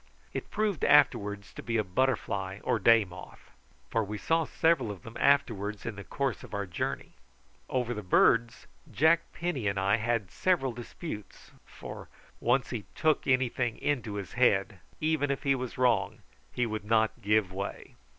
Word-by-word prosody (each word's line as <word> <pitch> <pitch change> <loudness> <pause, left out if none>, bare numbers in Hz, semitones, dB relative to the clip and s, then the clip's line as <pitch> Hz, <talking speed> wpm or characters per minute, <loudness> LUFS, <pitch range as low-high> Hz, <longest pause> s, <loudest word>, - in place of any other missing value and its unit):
It - - -5
proved 210 -6 -1
afterwards 105 -8 +3
to - - -8
be 115 -1 -1
a 110 - +2
butterfly 100 -3 -1
or 115 - +1
day 115 +1 +5
moth, 90 0 -13 0.4
for 115 - +1
we 105 +1 -5
saw 165 +8 +1
several 155 -7 +2
of 100 -4 -7
them 115 - -10
afterwards 110 -7 +1
in 115 - -4
the 100 - -8
course 135 +1 -2
of - - -8
our 100 0 -2
journey. 85 -3 -4 0.6
Over 125 -2 -1
the 105 - -5
birds 115 +5 +3 0.3
Jack 160 +3 +4
Penny 155 -11 -2
and 100 0 0
I 100 +3 +3
had 115 -4 -1
several 170 -9 +1
disputes, 120 - -8 0.2
for - - -9 0.3
once 125 +2 +1
he 115 -5 -4
took 155 -2 +1
anything 130 -2 +1
into 120 -8 -2
his 100 -3 -6
head, 100 -5 +2 0.2
even 155 -2 +1
if 140 - -2
he 140 - +3
was 130 -2 -4
wrong, 120 -6 +1 0.3
he 125 - 0
would 110 -2 -4
not 110 +2 +1
give 105 -2 +2
way. 100 +1 -6
115 Hz, 170 wpm, -29 LUFS, 100-135 Hz, 0.6 s, day